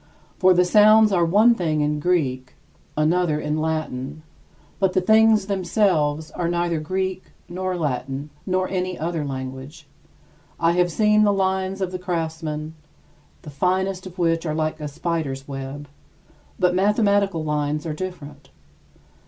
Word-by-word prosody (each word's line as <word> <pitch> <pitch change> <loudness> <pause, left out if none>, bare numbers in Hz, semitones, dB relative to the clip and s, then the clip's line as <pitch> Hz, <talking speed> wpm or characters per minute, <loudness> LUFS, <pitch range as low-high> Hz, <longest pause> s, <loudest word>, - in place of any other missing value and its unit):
For 185 -1 +5
the 180 +1 +4
sounds 215 +3 +6
are 175 -3 +3
one 210 +8 +5
thing 160 -8 -1
in 150 0 0
Greek, 135 -7 -1 0.4
another 155 0 +1
in 150 +1 -2
Latin; 155 -2 -3 0.6
but 190 -2 +2
the - - +3
things 220 +1 +4
themselves 175 -6 0
are 175 - -2
neither 170 -1 0
Greek 185 +3 -3 0.2
nor 185 +1 -3
Latin 140 -1 -3 0.2
nor 185 0 0
any 185 -1 -3
other 165 -1 -2
language. 135 +3 -7 0.7
I 165 0 +3
have 175 0 +1
seen 210 +3 +3
the 205 - +4
lines 190 0 -1
of 185 -1 -1
the 185 - -5
craftsmen, 160 -3 -4 0.7
the 150 - -9
finest 185 +4 -1
of 185 +1 -12
which 165 -2 +1
are 155 -2 -2
like 155 0 -2
a 150 - -3
spider's 145 -3 -3
web, 140 +1 -7 0.7
but 180 -1 +2
mathematical 200 -3 +2
lines 150 0 -2
are 160 - -3
different. 150 -4 -8
170 Hz, 145 wpm, -22 LUFS, 150-185 Hz, 0.7 s, sounds